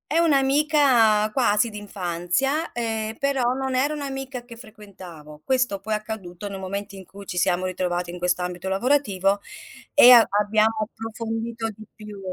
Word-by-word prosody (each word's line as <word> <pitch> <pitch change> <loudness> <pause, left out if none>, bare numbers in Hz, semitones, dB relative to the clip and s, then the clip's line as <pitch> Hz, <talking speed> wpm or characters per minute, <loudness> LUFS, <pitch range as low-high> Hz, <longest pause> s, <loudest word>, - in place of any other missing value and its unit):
È - - +2
un'amica 275 -8 +3
quasi 230 -3 +2
d'infanzia, 205 - -2
ehm, 225 -2 -3
però 265 -3 0
non 265 0 -3
era 280 +4 +1
un'amica 270 -3 -5
che 240 -1 -13
frequentavo. 185 - -13
Questo 250 -6 0
poi 220 - -4
è - - +3
accaduto 205 -3 -7
nel 195 -1 -7
momento 200 +1 -5
in 190 - -11
cui 200 +2 -13
ci 180 - -6
siamo 180 +1 +1
ritrovati 180 -1 -2
in 175 - -8
questo 180 0 0
ambito 180 +1 -5
lavorativo 200 -3 +1 0.5
e 245 - +8
a 240 -2 +10 0.2
abbiamo 215 +2 +2 0.2
approfondito 225 0 -5
di 215 0 -12
più. 210 -2 -10
215 Hz, 155 wpm, -23 LUFS, 190-255 Hz, 0.5 s, a